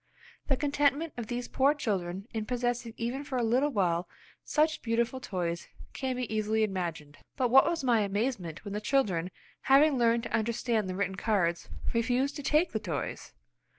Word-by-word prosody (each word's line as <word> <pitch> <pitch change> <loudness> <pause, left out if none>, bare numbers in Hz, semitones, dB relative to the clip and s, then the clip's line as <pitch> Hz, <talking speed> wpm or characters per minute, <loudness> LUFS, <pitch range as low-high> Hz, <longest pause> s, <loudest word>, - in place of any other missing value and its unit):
The 270 - +2
contentment 290 +2 +1
of 235 -3 -5
these 245 +1 -3
poor 275 +3 +3
children 195 -6 -2
in 220 -1 -3
possessing 245 -2 -2
even 245 +4 -3
for 275 -3 -3
a 245 - +1
little 250 +6 +2
while 180 -7 0 0.3
such 310 +1 +1
beautiful 235 +2 0
toys 175 -7 -3 0.3
can 260 -2 -2
be 245 -3 -3
easily 215 +1 +1
imagined. 170 -7 -3 0.2
But 250 -3 +1
what 270 +1 +8
was 335 -4 -1
my 240 -3 +4
amazement, 200 -4 -2
when 200 - -5
the 210 - -3
children, 195 -10 +1 0.3
having 275 0 +5
learned 230 0 +3
to - - -6
understand 225 -2 0
the 185 - -3
written 190 -1 -2
cards, 185 -5 0 0.2
refused 250 +4 +1
to - - -5
take 305 +5 +2
the - - -1
toys! - - -4
230 Hz, 175 wpm, -30 LUFS, 200-265 Hz, 0.3 s, what